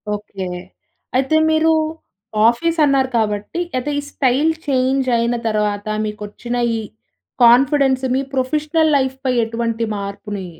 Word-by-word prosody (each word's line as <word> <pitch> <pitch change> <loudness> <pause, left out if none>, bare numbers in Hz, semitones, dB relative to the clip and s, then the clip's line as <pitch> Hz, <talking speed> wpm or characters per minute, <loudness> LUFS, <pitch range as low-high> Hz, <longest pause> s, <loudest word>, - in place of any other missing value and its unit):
Okay. 200 -2 -7 0.7
అయితే 270 +4 +2
మీరు 315 +1 +3 0.8
office 330 +8 -1
అన్నారు 270 -2 +2
కాబట్టి, 210 +7 -2 0.2
అయితే 255 +4 -2
ఈ - - -3
స్టైల్ 275 +4 +2 0.2
చేంజ్ 265 0 +1
అయిన 235 +1 0
తర్వాత, 210 -1 -1 0.2
మీకు 210 -1 -6
వచ్చిన 240 +4 -6 0.2
ఈ - - -2 0.6
కాన్ఫిడెన్స్ 265 +2 +4
మీ 265 - +1
ప్రొఫెషనల్ 305 +4 +1
లైఫ్ 265 -1 -1
పై 255 - +2
ఎటువంటి 230 0 -2
మార్పుని 200 0 -6
255 Hz, 125 wpm, -19 LUFS, 215-275 Hz, 0.8 s, కాన్ఫిడెన్స్